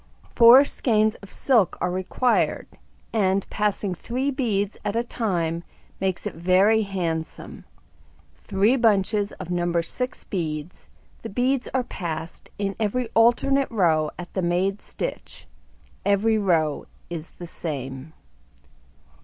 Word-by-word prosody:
Four 245 +4 +8
skeins 215 -5 +1
of 200 - -14
silk 235 -9 +2
are 180 - 0
required, 185 +7 0 0.5
and 195 -3 +1
passing 210 -2 -1
3 255 +9 -2
beads 215 -7 -1
at 205 - -2
a 235 - +1
time 170 -8 -2 0.4
makes 190 -2 -1
it - - -3
very 185 +6 +3
handsome: 170 -6 -4 0.7
3 210 +6 +2
bunches 210 -2 +2
of 175 - -8
No. 175 -1 +1
6 250 +10 -4
beads, 160 -3 -5 0.3
the 225 - -6
beads 250 +4 0
are 260 - +2
passed 165 -7 -6
in 200 -1 -2
every 225 +3 -1
alternate 260 +4 +3
row 165 -8 +2
at 175 0 -9
the 190 - -1
made 185 +3 0
stitch; - - -6 0.6
every 215 +2 +2
row 160 -7 +1 0.2
is 165 -1 -5
the 175 - -7
same. 140 -3 -6
195 Hz, 125 wpm, -24 LUFS, 175-225 Hz, 0.7 s, Four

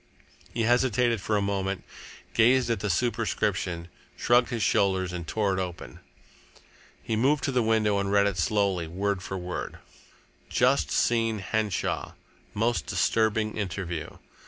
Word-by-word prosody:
He 115 - -1
hesitated 120 -1 +2
for 105 +2 0
a 100 - 0
moment, 100 -1 -2 0.5
gazed 120 +2 +4
at 115 - 0
the 105 - -2
superscription, 105 -5 -1 0.3
shrugged 120 0 +3
his 120 -3 -2
shoulders, 95 -2 +1
and 85 -2 -5
tore 105 -1 0
it 95 - -1
open. 90 -2 -7 1.0
He 110 - -1
moved 140 +6 +2
to 140 - 0
the 125 -1 +2
window 110 -2 +2
and 100 0 -1
read 100 0 +4
it 100 -3 -1
slowly, 95 -3 +1
word 95 +3 -2
for 95 +1 -5
word: 90 0 -5 0.7
"Just 130 +3 +2
seen 115 -2 +1
Henshaw. 105 0 -2 0.4
Most 115 +3 0
disturbing 110 +2 +1
interview. 90 -5 -4
105 Hz, 140 wpm, -27 LUFS, 95-115 Hz, 1.0 s, gazed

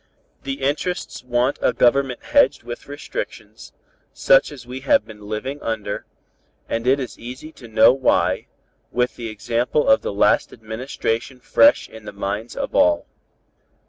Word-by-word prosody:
"The 135 0 -5
interests 150 +2 -2
want 125 +2 0
a - - +2
Government 130 +1 +2
hedged 285 - +3
with 120 - -8
restrictions, 145 - -7 0.4
such - - +4
as 125 -4 -11
we 125 +2 -7
have 130 -5 +3
been 105 -2 -12
living 130 +7 -4
under, 110 -3 -4 0.6
and 115 +2 -2
it 135 +2 +4
is 130 - -6
easy 130 +6 -8
to 125 - -13
know 110 +2 +6
why, 135 -1 +1 0.4
with 125 0 0
the 115 -2 -6
example 115 +7 -1
of 275 0 +5
the - - -3
last 100 - +2
administration 115 +2 -4
fresh 285 - +4
in 110 -1 -13
the - - -7
minds 100 +3 -4
of - - -4
all. 85 -1 +3
125 Hz, 150 wpm, -21 LUFS, 110-135 Hz, 0.6 s, know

